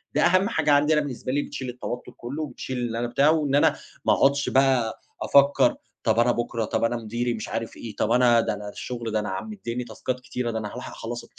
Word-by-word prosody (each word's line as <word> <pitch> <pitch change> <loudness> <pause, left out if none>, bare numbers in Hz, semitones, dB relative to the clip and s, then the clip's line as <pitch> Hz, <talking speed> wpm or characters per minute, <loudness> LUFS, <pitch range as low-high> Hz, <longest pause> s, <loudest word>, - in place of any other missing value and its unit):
ده - - +3
أهَمّ 185 +4 +4
حاجة 155 -7 +1
عندي 145 +2 +4
أنا، 150 - +3
بالنسبة 130 -3 -4
لي، 145 - +1
بتشيل 130 -2 -5
التوتُّر 125 0 -6
كله 140 +6 -5
وبتشيل 130 -1 -5
اللي 115 -2 -2
أنا 120 - -1
بتاع. 140 +5 +3
وإن 150 -3 +2
أنا 145 - +4 0.3
ما - - +5
أقعُدش 140 +1 +3
بقى 130 -4 +2 0.2
أفكر 140 - +4 0.3
"طب 110 -1 +2
أنا 120 +1 +4
بُكرة، 120 -1 -2
طب 110 +1 -1
أنا 120 +1 +1
مديري، 120 +2 -2
مش 110 -2 -5
عارِف 115 0 -4
إيه، 110 -3 -8
طب 110 - 0
أنا 120 -1 +5
ده - - -1
أنا 105 0 -6
الشغل، 115 +2 -5
ده 110 - +1
أنا 105 - -3
عم 95 - -4
مدِّيني 125 - -4
تاسكات 125 +2 -4
كتيرة، 125 -1 -3
ده 110 - -2
أنا 105 -1 -5
هارُوح 125 - -7
أخلَص" 120 +1 -6
125 Hz, 230 wpm, -25 LUFS, 115-140 Hz, 0.3 s, ما